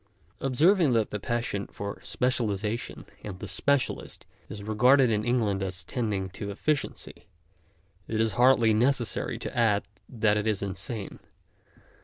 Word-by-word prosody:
Observing 155 +3 +3
that 115 -2 +1
the 105 - -3
passion 115 -2 -2
for 100 0 -6
specializa 115 -3 -1
tion - - -9 0.2
and 100 -3 -6
the 105 - -7
specialist 140 +8 -1 0.2
is 105 -1 -7
regarded 125 +4 +4
in 105 -1 +1
England 110 -5 +1
as 95 -1 -2
tending 105 -6 -2
to 100 +2 -6
efficiency, 140 +8 -3 0.8
it 110 - -2
is 110 0 +2
hardly 120 -1 +4
necessary 120 +2 +1
to - - -6
add 110 -4 +3 0.3
that 110 -3 +2
it 105 +1 -1
is 105 -2 0
insane. 100 +2 -5
110 Hz, 140 wpm, -27 LUFS, 100-125 Hz, 0.8 s, regarded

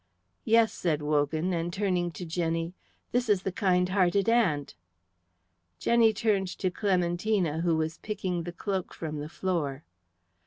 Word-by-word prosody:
"Yes," 225 0 +4
said 155 -4 -1
Wogan; 155 +4 +1
and 170 0 -1
turning 180 -2 0
to 180 - -6
Jenny, 165 0 -1 0.4
"This 245 -1 0
is 195 -3 +3
the 190 - -1
kind 180 -1 +2
hearted 190 +1 +2
aunt." 175 -12 +2 1.0
Jenny 230 - +4
turned 205 -2 +1
to 185 - 0
Clementina, 180 -3 0
who 170 -1 +2
was 160 0 -2
picking 190 -5 -3
the 175 +1 -5
cloak 190 +1 -3
from 155 -2 -5
the 150 +1 -5
floor. 160 -6 -2
180 Hz, 145 wpm, -28 LUFS, 165-200 Hz, 1.0 s, Yes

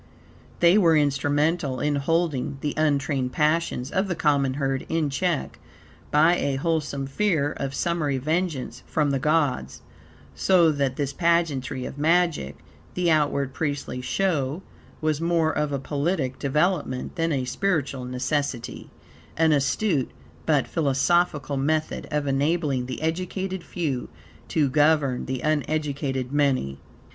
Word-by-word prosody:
They 175 +4 +6
were 165 -5 +5
instrumental 145 0 +1
in 145 -1 0
holding 150 -2 0
the 145 - -1
untrained 140 -4 0
passions 150 -4 0
of 190 +2 0
the 180 - -2
common 140 -4 +1
herd 135 -2 -1
in 160 -3 0
check, 170 0 -1 0.5
by 160 +4 +4
a 140 -1 0
wholesome 145 -2 -1
fear 150 -1 0
of 140 0 -3
summary 155 -3 0
vengeance 150 -4 -2
from 150 -2 +1
the 135 - 0
gods, 150 -1 0 0.5
so 175 -4 +4
that 140 -3 -1
this 140 -1 -2
pageantry 150 -7 0
of 140 - -7
magic, 160 - +1 0.4
the 175 -2 +2
outward 140 -3 +1
priestly 140 -2 -3
show, 160 0 -1 0.4
was 155 -1 0
more 165 -1 +2
of 150 -1 0
a 140 - 0
politic 140 -1 -2
development 150 -2 0
than 165 -1 0
a 135 -3 0
spiritual 145 -3 -1
necessity, 125 0 -3 0.5
an 160 0 +4
astute 145 - +1 0.4
but, 150 -4 +3
philosophical 150 0 +1
method 155 +3 -1
of 150 -1 -1
enabling 140 -2 0
the 130 +4 -5
educated 185 +2 -2
few 155 -8 -3 0.4
to 150 -3 +2
govern 145 -2 +2
the 130 -1 -3
uneducated 145 -3 -1
many. 130 - +1
145 Hz, 130 wpm, -25 LUFS, 135-165 Hz, 0.5 s, They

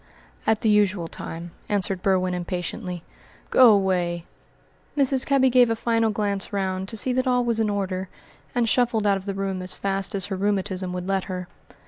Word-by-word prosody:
"At 220 -1 +2
the 220 - +2
usual 205 -4 +2
time," 165 +1 -7 0.2
answered 195 -2 0
Berwin 185 -1 +1
impatiently. 180 0 -4 0.5
"Go 250 -3 +8
away!" 180 -4 +1 0.7
Mrs. 270 -2 +3
Kebby 265 -2 +4
gave 245 -1 +5
a 225 - +1
final 230 0 +1
glance 205 -2 -2
round 190 -1 -2
to 225 - -3
see 250 +4 +2
that 255 +1 0
all 250 -1 +2
was 230 -2 0
in 220 -1 +1
order, 190 -2 -2 0.5
and 240 -2 +2
shuffled 230 -2 +2
out 200 -1 +3
of 190 - -9
the 200 -1 -3
room 195 -1 -2
as 185 0 -4
fast 195 0 -2
as 195 - -1
her 200 - -3
rheumatism 190 -1 -1
would 180 0 -4
let 195 -1 0
her. 180 -2 -5
195 Hz, 185 wpm, -24 LUFS, 185-225 Hz, 0.7 s, Go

